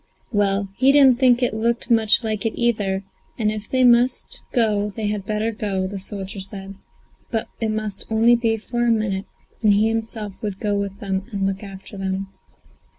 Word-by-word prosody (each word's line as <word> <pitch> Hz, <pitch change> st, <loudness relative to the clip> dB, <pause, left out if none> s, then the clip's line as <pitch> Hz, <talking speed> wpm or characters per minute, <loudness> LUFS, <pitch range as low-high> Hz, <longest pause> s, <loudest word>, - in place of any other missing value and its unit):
Well, 200 Hz, -2 st, +1 dB
he 270 Hz, +1 st, +6 dB
didn't 270 Hz, -4 st, +6 dB
think 250 Hz, -1 st, +4 dB
it 245 Hz, -, +1 dB
looked 235 Hz, +2 st, -1 dB
much 225 Hz, 0 st, +4 dB
like 215 Hz, -2 st, -2 dB
it 225 Hz, -, -2 dB
either, 205 Hz, -5 st, +1 dB, 0.3 s
and 215 Hz, -2 st, +1 dB
if 215 Hz, 0 st, -6 dB
they 255 Hz, -1 st, +2 dB
must 245 Hz, +1 st, +3 dB
go 210 Hz, -4 st, +2 dB
they 215 Hz, -2 st, -1 dB
had 205 Hz, -2 st, -3 dB
better 215 Hz, +1 st, 0 dB
go, 200 Hz, -3 st, -2 dB
the 195 Hz, +1 st, -5 dB
soldier 195 Hz, 0 st, -5 dB
said; 195 Hz, 0 st, -7 dB, 0.6 s
but 225 Hz, -2 st, -2 dB
it 225 Hz, -, 0 dB
must 215 Hz, -1 st, -4 dB
only 230 Hz, +2 st, +5 dB
be 230 Hz, -1 st, +1 dB
for 240 Hz, +2 st, -2 dB
a 240 Hz, -, +3 dB
minute, 210 Hz, -4 st, 0 dB, 0.4 s
and 215 Hz, -2 st, +5 dB
he 215 Hz, +2 st, +3 dB
himself 225 Hz, -2 st, -3 dB
would 205 Hz, -3 st, -4 dB
go 205 Hz, -1 st, 0 dB
with 200 Hz, 0 st, -3 dB
them 195 Hz, -1 st, -2 dB
and 195 Hz, -2 st, -1 dB
look 195 Hz, +1 st, -1 dB
after 195 Hz, 0 st, -10 dB
them. 190 Hz, 0 st, -2 dB
215 Hz, 190 wpm, -22 LUFS, 195-230 Hz, 0.6 s, he